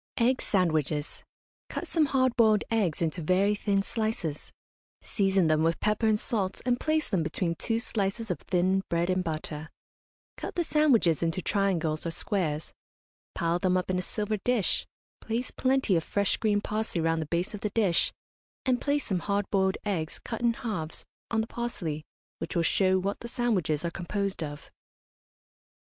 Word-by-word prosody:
EGG 255 +2 +3
SANDWICHES. 155 -6 0 0.5
Cut - - -4
some 315 -3 +2
hard 260 -3 +2
boiled 220 -3 +4
eggs 190 -8 +1
into 165 +1 -1
very 185 +5 +3
thin 200 -1 +1
slices; 215 -10 -2 0.5
season 195 -3 +2
them 155 -1 +3
with 165 +1 +2
pepper 215 +1 +1
and 215 -1 +3
salt, 200 -6 -1
and 245 -1 +2
place 310 0 +1
them 185 - +1
between 165 +2 -1
two 225 +6 -1
slices 225 -2 -1
of 170 - -2
thin 185 +1 +1
bread 170 +2 +1
and 185 0 +1
butter; 155 -1 -4 0.7
cut - - -5
the 345 - +1
sandwiches 260 - +3
into 165 +1 0
triangles 175 -5 +1
or 170 - -2
squares, 165 -3 -1 0.6
pile 170 +1 +1
them 185 0 +2
up 185 0 -1
in 180 - +1
a - - 0
silver 210 +3 -2
dish, 225 -1 0 0.3
place 230 +3 -2
plenty 260 -6 +2
of 165 - +1
fresh 200 +4 +1
green 210 -2 +2
parsley 215 -4 -2
round 165 0 +1
the 155 - -4
base 175 +5 -1
of 210 - -6
the 210 - -1
dish, 200 -5 +2 0.5
and 255 -1 +2
place 290 0 +1
some 190 -4 0
hard 200 +2 -1
boiled 190 -1 +2
eggs, 170 -6 -1
cut 225 - -4
in 235 -1 +3
halves, 210 -10 -4 0.2
on 225 -1 +1
the - - -2
parsley, 180 -12 -3 0.4
which - - -4
will 170 - +3
show 190 +3 +3
what 195 +2 -2
the 235 - -7
sandwiches 195 - 0
are 170 - -1
composed 195 +2 -2
of. 145 -1 -6
195 Hz, 175 wpm, -28 LUFS, 170-225 Hz, 0.7 s, boiled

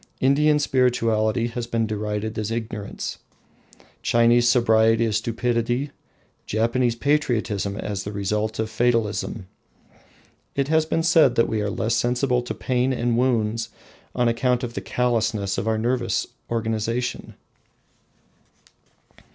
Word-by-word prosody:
Indian 150 +3 +3
spirituality 120 -5 +1
has 120 0 -5
been 115 -1 0
derided 105 0 -3
as 105 0 -2
ignorance, 115 -2 -5 0.8
Chinese 120 +1 +4
sobriety 115 -2 +4
as 110 -2 +1
stupidity, 120 +3 -1 0.6
Japanese 115 +2 +1
patriotism 115 -8 0
as 100 -2 -4
the 105 - -5
result 105 +2 -2
of 110 - -1
fatalism. 115 -3 0 1.1
It 140 0 0
has 160 0 +2
been 165 0 0
said 160 -7 +4
that 115 - +3
we 110 -1 -1
are 105 - -1
less 110 +2 -1
sensible 125 +2 +1
to 125 - -5
pain 125 +1 0
and 120 -1 0
wounds 115 -2 0 0.5
on 125 -1 +2
account 125 +2 +1
of 120 -1 -4
the 100 - -4
callousness 110 -3 0
of - - -4
our 110 0 +1
nervous 120 +1 0 0.2
organisation! 115 +1 -2
115 Hz, 125 wpm, -23 LUFS, 110-125 Hz, 1.1 s, Chinese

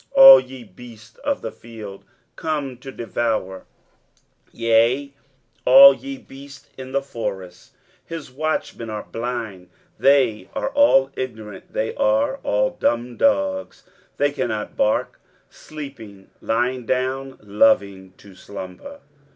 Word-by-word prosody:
23:056:009 - - +7
All 270 0 +12
ye 130 -1 -10
beasts 110 +2 -15
of 285 -1 -2
the - - -4
field, 110 -4 -11 0.3
come 145 -5 -3
to 135 +1 -9
devour, 115 -6 -3 0.9
yea, 115 +5 +1 0.5
all 135 +2 +9
ye 135 +1 -8
beasts 140 +1 -14
in 130 0 -9
the 140 +1 -1
forest. 95 -9 -7
23:056:010 - - -39 0.3
His 160 -5 -8
watchmen 140 -5 -3
are 105 -1 -5
blind: 115 -6 -6 0.3
they 130 -8 +2
are - - -2
all 275 - +4
ignorant, 110 -6 -7
they 110 - -2
are 110 +4 +1
all 105 0 0
dumb 120 +1 -1
dogs, 285 0 0 0.3
they - - +1
cannot - - -4
bark; - - 0 0.3
sleeping, 125 -10 -11
lying 120 +1 -1
down, 130 +1 -2
loving 100 -2 +1
to 100 -2 -16
slumber. 100 - -10
125 Hz, 125 wpm, -21 LUFS, 105-140 Hz, 0.9 s, All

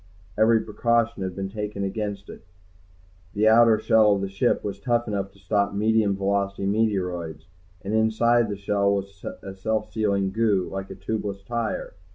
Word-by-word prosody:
Every 110 +1 +4
precaution 115 0 0
had 95 -1 -3
been 95 0 -4
taken 105 -1 -4
against 100 0 -4
it. - - -11 0.9
The 105 +1 +3
outer 115 0 +6
shell 110 -1 +4
of 100 - -3
the 100 - -3
ship 100 +6 0
was 100 -2 -4
tough 120 -1 0
enough 100 -2 -3
to - - -21
stop 100 +1 0
medium 105 -1 +2
velocity 100 0 -1
meteoroids, 90 -7 -1 0.4
and 100 - -3
inside 110 +1 +3
the 100 - -4
shell 100 0 +1
was 100 -1 -6 0.2
a 95 - -7
self 110 +2 -2
sealing 100 -3 0
goo, 105 -4 +1
like 95 0 -5
a - - -7
tubeless 100 0 -4
tire. 115 +1 -3
100 Hz, 170 wpm, -24 LUFS, 100-110 Hz, 0.9 s, outer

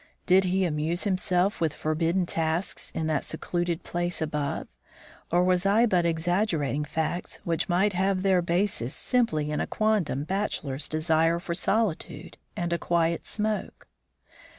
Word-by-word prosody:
Did 185 +1 +5
he 185 +1 +1
amuse 160 +2 -1
himself 185 -1 +1
with 160 -3 0
forbidden 165 +4 0
tasks 165 +2 -2
in 160 - -1
that 155 -2 0
secluded 175 +1 -2
place 175 0 -2
above, 150 -2 -2 0.6
or 175 +1 +4
was 180 0 +2
I 205 +4 +4
but 180 -6 +2
exaggerating 165 -3 0
facts 160 +3 -3
which 165 +1 -1
might 190 +4 +2
have 190 +1 +1
their 190 -2 +4
basis 170 - 0
simply 155 - +1
in 150 - -1
a - - -2
quondam 210 -10 0
bachelor's 155 -6 -2
desire 160 +1 +2
for 170 0 -4
solitude 195 0 -1 0.2
and 175 0 -1
a 170 - 0
quiet 170 -1 0
smoke. 215 0 -2
175 Hz, 145 wpm, -27 LUFS, 160-190 Hz, 0.6 s, Did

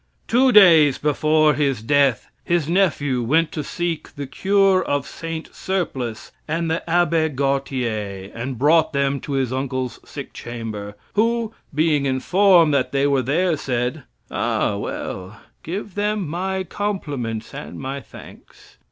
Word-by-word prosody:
Two 255 +3 +4
days 165 - +7
before 155 +1 +3
his 135 -6 0
death, 140 -2 +2 0.2
his 170 -4 0
nephew 155 -8 +1
went 155 +7 +2
to 155 - -4
seek 170 +2 -4
the 140 - -5
cure 195 +6 +3
of 145 -1 -1
Saint 165 +1 -7
Surplice 130 -12 -3 0.2
and 165 +1 -1
the 165 - 0
Abbe 165 -2 +2
Gautier, 125 -8 -2
and 125 +2 -5
brought 160 +5 +3
them 140 0 +1
to 140 - -6
his 130 -2 0
uncle's 130 -1 -3
sick - - -9
chamber, 110 -4 -6 0.2
who, 230 +1 +1 0.2
being 150 -2 +2
informed 170 +4 +4
that 130 -2 +1
they 140 0 +1
were 140 -2 +2
there, 160 +7 +1
said: 125 +1 -2 0.3
"Ah, - - 0
well, 95 +3 -5 0.2
give 195 +4 -5
them 205 -2 -1
my 190 +4 -2
compliments 145 - -4
and 145 +2 -8
my 135 +1 -4
thanks." - - -15
145 Hz, 140 wpm, -21 LUFS, 130-175 Hz, 0.3 s, days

